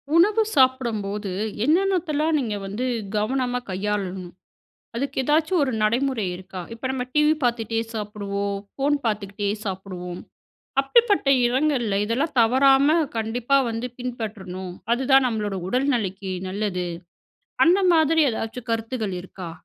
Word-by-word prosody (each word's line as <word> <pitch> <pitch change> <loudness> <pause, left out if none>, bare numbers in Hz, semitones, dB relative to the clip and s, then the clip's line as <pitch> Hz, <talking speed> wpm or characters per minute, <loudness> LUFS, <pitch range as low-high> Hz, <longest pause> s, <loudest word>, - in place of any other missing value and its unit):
உணவு 410 +6 +5
சாப்டம்போது 220 -7 +1 0.3
என்னென்னத்தெல்லாம் 325 -2 +2
நீங்க 225 -6 -2
வந்து 205 +6 -3 0.3
கவனமா 250 +3 0
கையாளணும்? 190 -2 -3 0.6
அதுக்கு 275 +3 -3
ஏதாச்சும் 310 +5 +2
ஒரு 265 - 0
நடைமுறை 240 0 +1
இருக்கா? 185 0 -8
இப்ப 230 +3 -4
நம்ம 260 -1 -2
டிவி 300 0 +4
பார்த்துட்டே 230 -2 0
சாப்புடுவோம், 200 -2 -3 0.2
ஃபோன் 285 +2 +2
பார்த்துகிட்டே 205 -2 -2 0.2
சாப்புடுவோம், 185 -2 -5 0.6
அப்டிப்பட்ட 410 - +3 0.2
எடங்கள்ல 245 -5 +1
இதெல்லாம் 265 +8 -1
தவறாம 270 +6 +5 0.2
கண்டிப்பா 235 +5 +1
வந்து 230 +2 -3
பின்பற்றணும். 205 -7 -5 0.2
அதுதான் 265 +1 +4
நம்மளோட 210 -4 -2
உடல் 260 +6 +1
நெலைக்கி 195 -4 -3 0.2
நல்லது. 190 -2 -2 0.8
அந்த 355 +4 +5
மாதிரி 320 0 +4
எதாச்சும் 230 +2 -5
கருத்துகள் 225 -3 -2
இருக்கா? 180 -1 -8
230 Hz, 115 wpm, -24 LUFS, 200-275 Hz, 0.8 s, உணவு